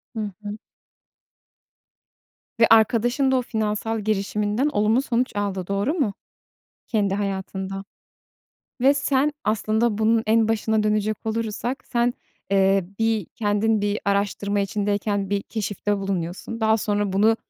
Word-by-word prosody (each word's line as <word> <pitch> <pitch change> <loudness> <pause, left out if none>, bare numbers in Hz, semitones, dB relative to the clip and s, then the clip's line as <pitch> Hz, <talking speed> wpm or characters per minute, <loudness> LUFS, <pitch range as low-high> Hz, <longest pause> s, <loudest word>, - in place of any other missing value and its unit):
Hı 215 -2 -3
hı. 205 +1 -5 2.0
Ve 225 - +6
arkadaşın 240 +4 +4
da - - +3
o - - +2
finansal 220 -1 -2
girişiminden 210 +4 0
olumlu 220 -1 +2
sonuç 250 -3 -1
aldı, 195 -3 -2
doğru 200 +9 0
mu 270 - 0 0.7
kendi 205 -4 +1
hayatında? 195 -1 -3 1.0
Ve 275 +3 +5
sen 280 +1 +1
aslında 215 +1 +1
bunun 225 +1 +3
en 220 0 +3
başına 220 -1 +1
dönecek 215 0 0
olursak, 230 +3 -2
sen, 240 0 +2 0.4
eee, 195 -1 +3
bir 225 -4 +1
kendin 215 -1 +1
bir 205 +1 0
araştırma 200 0 0
içindeyken 205 0 -1
bir 200 -1 0
keşifte 205 -1 -2
bulunuyorsun, 195 +4 -4
daha 220 0 +4
sonra 205 -2 -1
bunu 220 +3 +4
215 Hz, 125 wpm, -23 LUFS, 200-225 Hz, 2.0 s, Ve